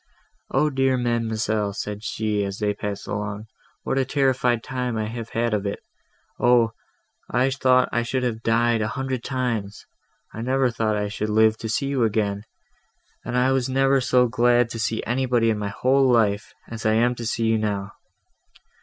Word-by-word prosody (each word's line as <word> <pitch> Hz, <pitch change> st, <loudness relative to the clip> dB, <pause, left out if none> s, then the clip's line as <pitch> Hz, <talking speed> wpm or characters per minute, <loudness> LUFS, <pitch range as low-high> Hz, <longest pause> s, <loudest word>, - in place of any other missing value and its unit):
"Oh 150 Hz, +2 st, +2 dB
dear 135 Hz, -1 st, +2 dB
ma'amselle," 110 Hz, -3 st, -1 dB
said 105 Hz, 0 st, -5 dB
she, 105 Hz, -2 st, -1 dB
as 100 Hz, 0 st, -4 dB
they 105 Hz, -1 st, 0 dB
passed 100 Hz, -1 st, -5 dB
along, 105 Hz, +1 st, -4 dB, 0.4 s
"what 135 Hz, -, 0 dB
a -, -, +3 dB
terrified 130 Hz, -3 st, +1 dB
time 125 Hz, -3 st, -3 dB
have 110 Hz, +1 st, -4 dB
I -, -, -4 dB
had 120 Hz, -1 st, +1 dB
of 105 Hz, -1 st, -1 dB
it! 100 Hz, -, -3 dB, 0.6 s
Oh! 120 Hz, -2 st, +4 dB, 0.6 s
I 125 Hz, +3 st, +2 dB
thought 130 Hz, -2 st, +3 dB
I 120 Hz, -, +1 dB
should 125 Hz, +2 st, -2 dB
have 115 Hz, -3 st, -2 dB
died 115 Hz, 0 st, +2 dB
a 105 Hz, -, 0 dB
hundred 130 Hz, 0 st, -3 dB
times! 120 Hz, -6 st, -3 dB, 0.5 s
I 110 Hz, -, -6 dB
never 130 Hz, +1 st, +1 dB
thought 110 Hz, -2 st, 0 dB
I 105 Hz, 0 st, -1 dB
should 105 Hz, +1 st, -3 dB
live 110 Hz, +1 st, +4 dB
to 110 Hz, -, -5 dB
see 115 Hz, +5 st, 0 dB
you 135 Hz, -3 st, 0 dB
again! 105 Hz, -2 st, 0 dB, 0.8 s
and 125 Hz, -, -2 dB
I 130 Hz, +1 st, +3 dB, 0.2 s
never 135 Hz, +1 st, +2 dB
was 130 Hz, -2 st, +2 dB
so 125 Hz, -1 st, +4 dB
glad 120 Hz, 0 st, +2 dB
to 115 Hz, -, -5 dB
see 110 Hz, 0 st, -1 dB
anybody 120 Hz, -2 st, +1 dB
in 105 Hz, -, -2 dB
my 105 Hz, -1 st, -2 dB
whole 130 Hz, +4 st, +2 dB
life, 105 Hz, -3 st, +2 dB, 0.2 s
as 115 Hz, -1 st, -7 dB
I 110 Hz, -, +2 dB
am 120 Hz, +2 st, +3 dB
to 120 Hz, -1 st, -7 dB
see 115 Hz, 0 st, -1 dB
you 110 Hz, 0 st, +2 dB
now." 100 Hz, -2 st, -2 dB
115 Hz, 185 wpm, -23 LUFS, 110-125 Hz, 0.8 s, Oh